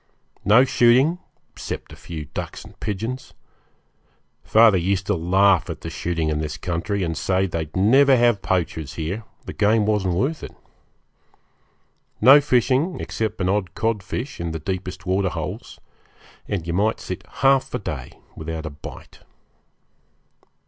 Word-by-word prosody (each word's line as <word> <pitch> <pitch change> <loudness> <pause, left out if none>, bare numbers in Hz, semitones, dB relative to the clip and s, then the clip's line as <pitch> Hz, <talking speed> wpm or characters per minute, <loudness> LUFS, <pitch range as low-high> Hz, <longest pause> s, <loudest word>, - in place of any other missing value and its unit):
No 120 +6 +6
shooting, 130 +8 +4 0.3
except - - -7
a - - -10
few 80 -3 -7
ducks - - -7
and - - -16
pigeons. 115 +5 -4 1.1
Father 110 -4 +5
used 95 +2 0
to - - +1
laugh 95 +2 +3
at - - -6
the - - -6
shooting 85 -2 -2
in 75 -1 -1
this 75 -1 -4
country, 90 +5 -2
and 80 -2 -2
say 95 +6 +1
they'd 80 -4 -4
never 130 +8 +5
have 120 -4 +3
poachers 80 -5 -2
here 90 +8 -4 0.2
the - - -6
game 105 +1 +2
wasn't 100 -4 +1
worth 140 - -1
it. - - -9 1.6
No 135 +6 +8
fishing, 135 +5 +1
except 110 -1 -3
an 90 - +1
odd 95 -4 -1
codfish, 115 +4 -3
in 85 -1 -3
the 80 - -4
deepest 95 +3 -5
waterholes; 95 0 -2 0.7
and 95 -6 -3
you 85 - -3
might 105 +5 +1
sit 90 - -6 0.2
half 135 -1 +4
a - - +1
day - - -6 0.2
without 80 0 -5
a 80 - -5
bite. 70 -1 -11
95 Hz, 145 wpm, -22 LUFS, 85-115 Hz, 1.6 s, No